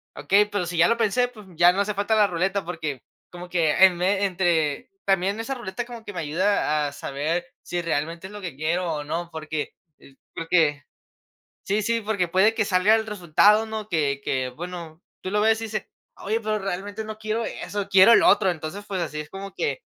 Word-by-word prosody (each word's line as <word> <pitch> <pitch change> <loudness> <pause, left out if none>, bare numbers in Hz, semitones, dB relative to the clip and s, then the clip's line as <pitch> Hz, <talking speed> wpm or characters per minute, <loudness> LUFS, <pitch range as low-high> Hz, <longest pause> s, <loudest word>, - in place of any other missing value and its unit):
"Okey, 195 +8 +3
pero, 205 -3 -1
si 175 +1 -5
ya 170 - +6
lo 230 - +2
pensé", 235 +2 +2
pues, 215 -4 -14
ya 175 +2 +6
no 185 - -3
hace 210 +1 -1
falta 205 +2 0
la 210 -1 +5
ruleta 190 +1 -1
porque, 155 -7 -5 0.3
como 180 0 -9
que 170 -3 +1
em, 180 -2 +2
entre 180 -6 +1
también 195 +2 +1
esa 270 +4 -4
ruleta 240 -1 -5
como 235 -2 -10
que 205 - -7
me 180 - -4
ayuda 155 -2 +1
a - - -5
saber 150 +5 -3 0.2
si 175 0 -3
realmente 165 +2 -3
es 200 - -13
lo 210 - -7
que 175 -8 -6
quiero 165 +5 -1
o 150 -1 -4
no, 170 +3 -4
porque, 155 -1 -4 0.3
eh, 135 - -18 0.2
porque 160 -3 +1 0.8
Sí, 205 +2 +1
sí, 230 +2 0
porque 205 -4 -1
puede 190 +6 +3
que 220 - +1
salga 200 +2 +4
el 220 0 -1
resultado, 210 +2 +3
¿no? 220 -1 -5
Que 145 -6 0
que, 130 -1 -1
bueno, 170 +3 -8 0.2
tú 185 - -5
lo 210 - +1
ves 220 +1 +3
y - - -3
dices: 215 -2 -4 0.3
"Oye, 220 +3 -1
pero, 215 -1 -1
realmente 200 +3 -4
no 215 0 -7
quiero 220 +1 -2
eso, 200 +1 -4
quiero 195 +3 +7
el - - +6
otro". 190 -3 +5
Entonces, 160 +4 -6
pues 190 -3 -2
así 155 -2 -4
es 150 - -11
como 195 +2 -8
que 475 +2 -2
185 Hz, 210 wpm, -24 LUFS, 165-210 Hz, 0.8 s, quiero